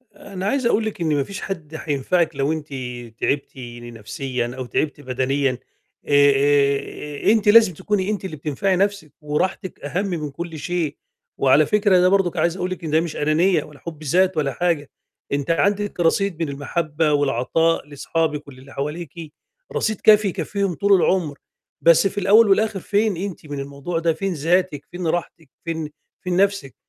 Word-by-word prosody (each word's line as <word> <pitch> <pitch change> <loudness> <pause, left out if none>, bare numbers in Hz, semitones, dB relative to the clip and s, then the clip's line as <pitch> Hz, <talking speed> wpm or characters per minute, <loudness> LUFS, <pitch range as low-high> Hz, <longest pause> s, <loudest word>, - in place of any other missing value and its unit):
أنا 190 -2 -7
عايز 265 +3 0
أقول 225 -1 +2
لِك 215 -5 -5
إن 155 -3 +1
ما 140 - +1
فيش 200 +6 -8
حد 160 -5 -6
حينفعِك 155 +2 0
لو 140 +2 0
أنتِ 155 -2 -4 0.5
تعبتِ 140 0 0 0.3
نفسيًا 120 +2 -4
أو 130 - -4
تعبتِ 145 +4 -2
بدنيًا 130 0 0 0.5
آآ 145 -1 +5
آآ، 140 +3 +1
أنتِ 220 -1 +2
لازم 210 -3 +7
تكوني 200 +3 -1
أنتِ 205 -2 -2
اللي 180 - -5
بتنفعي 155 +6 -1
نَفسِك 195 -5 -1
وراحتِك 155 +5 -2
أهم 170 +8 -2
من 160 -7 -3
كُلّ 165 +2 -6
شيء، 170 -2 -2 0.4
وعلى 135 +3 +5
فكرة 205 -1 +3
ده 180 +1 +5
برضه 185 -3 +1
عايز 170 +2 +1
أقول 180 - -2
لِك 185 - -5
إن 160 - -4
ده 160 +1 +4
مش 165 -2 -5
أنانية 155 +2 +2
ولا 150 -2 -15
حُبّ 155 +1 -9
ذات 180 +4 +2
ولا 140 -3 0
حاجة، 165 -1 -1 0.4
أنتِ 140 +2 0
عندك 205 +3 0
رصيد 175 +1 +1
من 155 - -3
المحبّة 150 +2 -1
والعطاء 145 +4 +1
لصحابِك 150 +1 -2
وللّي 135 0 -13
حواليكِ، 155 +2 -6 0.4
رصيد 215 -1 -1
كافي 215 -1 +6
يكفّيهم 195 0 -2
طُول 200 +5 +2
العمر، 175 -5 +2 0.4
بس 170 +3 +5
في 195 - -8
الأول 205 +3 +5
والآخر 210 0 +2
فين 205 +1 0
أنتِ 185 -3 -5
من 145 -1 -5
الموضوع 140 +5 -4
ده، 165 0 +1
فين 190 +4 -2
ذاتِك 165 -1 0
فين 175 -1 -4
راحتِك 160 -2 -3 0.2
فين، 160 -2 -3 0.3
فين 180 -1 -1
نفسِك 195 -8 +1
165 Hz, 170 wpm, -22 LUFS, 145-190 Hz, 0.5 s, لازم